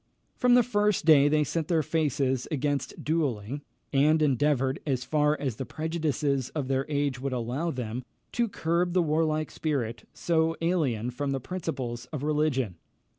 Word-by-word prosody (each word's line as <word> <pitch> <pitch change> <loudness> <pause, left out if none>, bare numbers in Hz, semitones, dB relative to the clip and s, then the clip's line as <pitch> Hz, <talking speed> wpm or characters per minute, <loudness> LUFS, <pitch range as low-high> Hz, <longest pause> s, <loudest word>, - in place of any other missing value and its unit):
From 250 -1 +4
the 245 - +6
first 210 -6 +1
they 150 -1 +6
set 160 +1 -2
their 165 -3 +2
faces 140 -5 0
against 145 -1 -2
duelling, 140 -5 -1 0.3
and 150 +3 +4
endeavoured, 140 -1 +2
as 130 -4 -1
far 150 +2 +1
as 130 -6 -2
the - - -3
prejudices 150 -5 -1
of 145 -4 -2
their 135 0 0
age 140 -3 0
would 135 0 -3
allow 125 +7 -2
them, 125 -3 -4 0.3
to 240 -1 +1
curb 175 -1 0
the 180 -1 +3
warlike 155 -1 0
spirit, 130 -7 -3
so 165 -1 +1
alien 140 -10 0
from 140 +3 -2
the 135 - -1
principles 130 -7 -4
of 140 +2 -6
religion. 145 - 0
145 Hz, 155 wpm, -28 LUFS, 130-160 Hz, 0.3 s, the